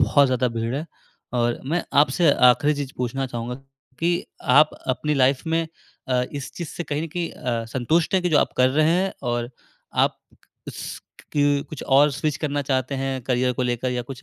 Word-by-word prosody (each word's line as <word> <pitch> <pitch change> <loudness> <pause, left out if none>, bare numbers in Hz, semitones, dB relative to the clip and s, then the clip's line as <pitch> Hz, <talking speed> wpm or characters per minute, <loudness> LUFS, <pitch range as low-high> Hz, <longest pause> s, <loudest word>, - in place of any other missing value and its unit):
बहुत 145 -1 +5
ज़्यादा 125 -1 +1
भीड़ 115 +1 -3
है। 150 +4 -3 0.5
और 120 -1 0
मैं 170 +5 0 0.2
आपसे 150 +3 +4
आख़िरी 125 +4 +4
चीज़ 140 -2 -5
पूछना 130 +2 -2
चाहूँगा 120 0 -5 0.4
कि 175 +1 0 0.2
आप 150 +4 +5 0.2
अपनी 150 +4 0
लाइफ़ 135 -1 +3
में 165 0 +1 0.4
अ, 125 -1 +2
इस 140 -3 -6
चीज़ 170 -3 -5
से - - -5
कहीं 145 0 -2
न - - -3
कहीं 170 +2 -3
अ, 120 -2 -3
संतुष्ट 130 +10 0
हैं 185 - +3
कि 180 - +1
जो 155 - +4
आप - - +1
कर 125 0 +5
रहे 155 +3 +3
हैं 185 +3 +1
और 120 -1 -2 0.4
आप - - +2 0.2
क - - -32 0.2
अस्क - - -7 0.3
क 145 0 +3
कुछ 155 - -7
और 140 +2 +5
स्विच 145 +1 -2
करना 145 -2 -2
चाहते 130 0 -1
हैं 135 0 -2
करियर 125 0 +1
को 125 - -2
लेकर 125 +1 -1
या 125 -1 -2
कुछ 130 +2 -9
135 Hz, 205 wpm, -23 LUFS, 125-150 Hz, 0.5 s, बहुत